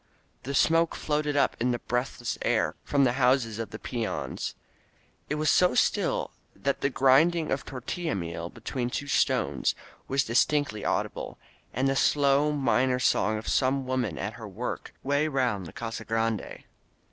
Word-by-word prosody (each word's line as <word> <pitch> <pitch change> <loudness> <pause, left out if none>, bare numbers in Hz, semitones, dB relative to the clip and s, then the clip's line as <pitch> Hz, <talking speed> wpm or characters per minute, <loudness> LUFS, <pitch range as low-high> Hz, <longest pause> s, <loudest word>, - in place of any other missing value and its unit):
Thin 140 +2 -3
smoke 165 +3 +3
floated 150 -1 -1
up 140 - +3
in 125 +2 +1
the 120 - +1
breathless 120 0 -2
air - - +1
from 140 -1 +2
the 125 - +4
houses 125 -3 +2
of 115 - -4
the 110 - -7
peons. 115 -1 -4 0.7
It 150 - 0
was 150 -1 +2
so 180 0 +4
still - - +1 0.2
that 140 0 -2
the 140 - +2
grinding 150 +5 +3
of 135 - 0
tortilla 145 +6 -4
meal 85 -2 -4
between 120 +3 -4
two 140 - -3
stones 140 - +1 0.3
was 135 0 +2
distinctly 125 -1 +1
audi - - 0
ble - - -7 0.2
— - - -25
^and 130 +3 +1
the 135 0 +2
slow, 140 +1 +3
minor 130 -2 +2
song 110 -3 +2
of 110 - -7
some 135 0 +1
woman 125 - -1
at 100 +7 -3
her 115 -2 -9
work 105 +5 -5
way 145 +3 +1
around 125 - 0
the 80 - -9
Casa 115 -1 -5
Grande. 115 -1 -2
130 Hz, 170 wpm, -27 LUFS, 115-140 Hz, 0.7 s, the